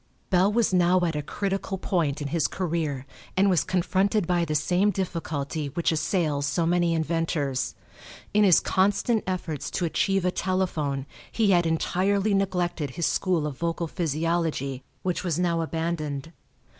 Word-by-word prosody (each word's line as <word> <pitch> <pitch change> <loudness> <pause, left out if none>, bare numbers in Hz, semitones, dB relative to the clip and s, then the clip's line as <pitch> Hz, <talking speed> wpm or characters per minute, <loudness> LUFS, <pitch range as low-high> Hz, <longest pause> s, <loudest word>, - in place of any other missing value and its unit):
Bell 190 +2 +4
was 225 -3 +2
now 180 0 +4
at 165 -3 0
a 150 - -1
critical 195 +4 -3
point 160 -6 -1
in 140 - -3
his 160 -2 +1
career 160 -7 -2 0.3
and 195 +1 +4
was 175 - +3
confronted 190 +2 +1
by 175 0 +1
the 155 -1 -2
same 180 +7 +2
difficulty 160 -6 -3
which 165 +5 0
assails 155 -4 0
so 160 +4 0
many 170 0 +2
inventors. 160 -4 -1 0.6
In 210 0 +5
his 185 -4 +6
constant 205 +4 +1
efforts 170 -6 -3
to 180 - -1
achieve 195 +3 +1
a 180 - +2
telephone 165 -8 -1 0.3
he 215 -3 +2
had 175 -2 +4
entirely 195 +5 +1
neglected 180 -6 0
his 170 - +1
school 180 -5 +1
of 145 -4 -5
vocal 170 0 -1
physiology, 160 -4 -1 0.2
which 180 -1 -1
was 170 -4 -1
now 170 -2 +1
abandoned. 160 -3 -3
170 Hz, 155 wpm, -26 LUFS, 155-185 Hz, 0.6 s, his